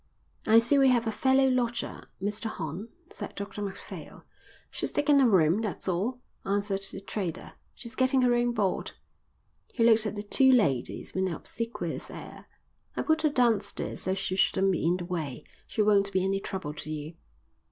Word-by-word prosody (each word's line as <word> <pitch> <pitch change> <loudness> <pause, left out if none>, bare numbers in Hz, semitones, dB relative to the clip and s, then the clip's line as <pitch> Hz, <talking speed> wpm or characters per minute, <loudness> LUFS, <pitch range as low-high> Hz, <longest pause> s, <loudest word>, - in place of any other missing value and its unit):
"I 220 +1 +7
see 240 +5 +5
we 270 - +6
have 240 -2 +3
a 225 - 0
fellow 265 +4 +3
lodger, 245 -2 -1 0.2
Mr 205 +3 -2
Horn," 180 0 -5 0.2
said 205 - -7
Dr 200 0 -6
Macphail. 195 -2 -8 0.5
"She's - - -3
taken 290 -1 +4
a 255 - +5
room, 180 0 +4
that's 210 -3 -4
all," 200 +8 -1 0.2
answered 200 0 0
the - - -7
trader. 195 -4 -4 0.2
"She's 240 0 -8
getting 260 0 +3
her 245 -1 +4
own 240 0 +2
board." 205 -5 -1 0.8
He 230 - 0
looked 225 -1 +5
at 215 - -4
the 205 - -4
two 265 +5 +4
ladies 140 - +1
with 190 0 0
an 180 - -2
obsequious 230 +7 -4
air. - - -10 0.5
"I - - 0
put 315 0 +2
her 310 - +3
downstairs 230 -7 0
so 190 +1 0
she 195 -1 -2
shouldn't 195 0 +3
be 180 - -1
in 175 +2 +2
the 175 - -6
way. 155 -6 -4 0.2
She 215 - 0
won't 200 -1 +3
be 190 -1 +1
any 195 0 0
trouble 185 -6 -5
to 150 0 -8
you." 155 +1 -5
205 Hz, 185 wpm, -28 LUFS, 190-240 Hz, 0.8 s, I